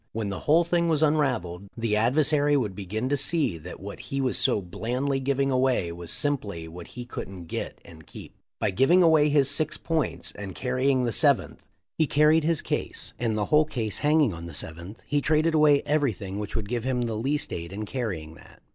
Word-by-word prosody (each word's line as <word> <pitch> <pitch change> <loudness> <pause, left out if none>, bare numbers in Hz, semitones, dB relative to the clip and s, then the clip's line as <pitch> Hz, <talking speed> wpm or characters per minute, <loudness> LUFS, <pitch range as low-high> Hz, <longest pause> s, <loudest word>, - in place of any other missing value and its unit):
When 110 -2 -2
the 100 - -4
whole 160 +3 +4
thing 170 0 +1
was 160 -1 +2
unravelled, 125 - 0
the 115 -2 0
adversary 145 +5 +3
would 110 -7 -1
begin 105 +5 -4
to 145 - +2
see 145 - 0
that 90 +3 -9
what 100 +2 -8
he 140 - -2
was 130 -2 +1
so 125 -5 +3
blandly 125 +9 -2
giving 135 0 0
away 130 -9 +1
was 85 0 -9
simply 105 - -2
what 85 +1 -10
he 120 - -5
couldn't 95 -7 -7
get - - -5
and 80 -2 -14
keep. - - -11 0.2
By - - 0
giving 160 - +4
away 155 -3 +5
six 155 +3 -1
points 130 - -2
and 100 -3 -8
carrying 130 +1 +1
the 120 - 0
seventh - - +2 0.4
he 160 - +3
carried 150 +2 +4
his 165 -1 +1
case, - - -3
and 115 -2 0
the 105 - 0
whole 150 +1 +6
case 110 -8 -3
hanging 150 - +3
on 85 +1 -8
the 85 - -6
seventh, 85 +8 -5
he 145 -1 0
traded 155 +2 +2
away 150 -2 +5
everything 110 -10 -1
which 105 -2 -5
would 110 -2 -2
give 120 +1 -2
him 125 -1 0
the 115 -1 -2
least 135 +7 -2
aid 85 +1 -5
in 105 +2 -5
carrying 100 -11 -4
that. - - -17
125 Hz, 200 wpm, -26 LUFS, 100-145 Hz, 0.4 s, whole